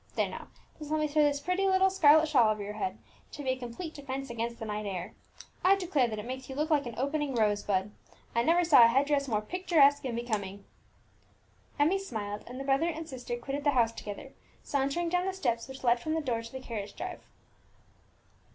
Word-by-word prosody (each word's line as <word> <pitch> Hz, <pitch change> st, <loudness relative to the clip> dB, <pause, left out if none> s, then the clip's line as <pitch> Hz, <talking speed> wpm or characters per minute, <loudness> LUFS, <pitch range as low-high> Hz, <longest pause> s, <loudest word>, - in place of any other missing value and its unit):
There -, -, +1 dB
now, -, -, -8 dB, 0.3 s
just 300 Hz, -1 st, -8 dB
let 310 Hz, 0 st, +1 dB
me 305 Hz, -, +1 dB
throw 300 Hz, +1 st, +2 dB
this 290 Hz, -1 st, +2 dB
pretty 365 Hz, +5 st, 0 dB
little 380 Hz, 0 st, +4 dB
scarlet 315 Hz, -3 st, +6 dB
shawl 250 Hz, -7 st, +4 dB
over 210 Hz, -1 st, -3 dB
your 205 Hz, +1 st, -5 dB
head, 375 Hz, -, -3 dB, 0.4 s
to 290 Hz, -, -7 dB
be 265 Hz, -, -2 dB
a -, -, 0 dB
complete 255 Hz, +7 st, -7 dB
defence 270 Hz, -2 st, -5 dB
against 235 Hz, 0 st, -3 dB
the 225 Hz, -, -6 dB
night 210 Hz, -1 st, -4 dB
air! 185 Hz, -3 st, -5 dB, 0.5 s
I 385 Hz, +2 st, +6 dB
declare 345 Hz, -10 st, +1 dB
that 215 Hz, -2 st, -5 dB
it 210 Hz, -, -6 dB
makes 260 Hz, +2 st, -6 dB
you 265 Hz, -, -6 dB
look 305 Hz, +3 st, -1 dB
like 290 Hz, -4 st, +2 dB
an 235 Hz, -, -7 dB
opening 280 Hz, +1 st, -1 dB
rose 210 Hz, -2 st, +2 dB
bud; 195 Hz, 0 st, -1 dB, 0.4 s
I 235 Hz, -, +2 dB
never 335 Hz, +7 st, +3 dB
saw 305 Hz, -8 st, +7 dB
a -, -, +8 dB
headdress 280 Hz, +3 st, +2 dB
more 215 Hz, -4 st, 0 dB
picturesque 300 Hz, -2 st, +3 dB
and 250 Hz, -3 st, -3 dB
becoming!" 205 Hz, -4 st, -4 dB, 1.1 s
Emmie 320 Hz, +7 st, +3 dB
smiled, 210 Hz, -, -5 dB
and 250 Hz, +2 st, -8 dB
the -, -, -4 dB
brother 275 Hz, +5 st, +2 dB
and 320 Hz, -1 st, -5 dB
sister 245 Hz, -4 st, -5 dB
quitted 275 Hz, +4 st, -4 dB
the 290 Hz, -1 st, +3 dB
house 230 Hz, -2 st, +4 dB
together, 230 Hz, +6 st, -8 dB, 0.3 s
sauntering 280 Hz, +5 st, -1 dB
down 360 Hz, +2 st, 0 dB
the 385 Hz, -, -1 dB
steps 240 Hz, -11 st, -1 dB
which 265 Hz, 0 st, -10 dB
led 240 Hz, -1 st, +3 dB
from 310 Hz, +6 st, -2 dB
the -, -, +1 dB
door 240 Hz, -6 st, -1 dB
to 230 Hz, 0 st, -10 dB
the 260 Hz, -, -6 dB
carriage 210 Hz, -5 st, -6 dB
drive. 365 Hz, -1 st, -6 dB
270 Hz, 220 wpm, -30 LUFS, 230-310 Hz, 1.1 s, a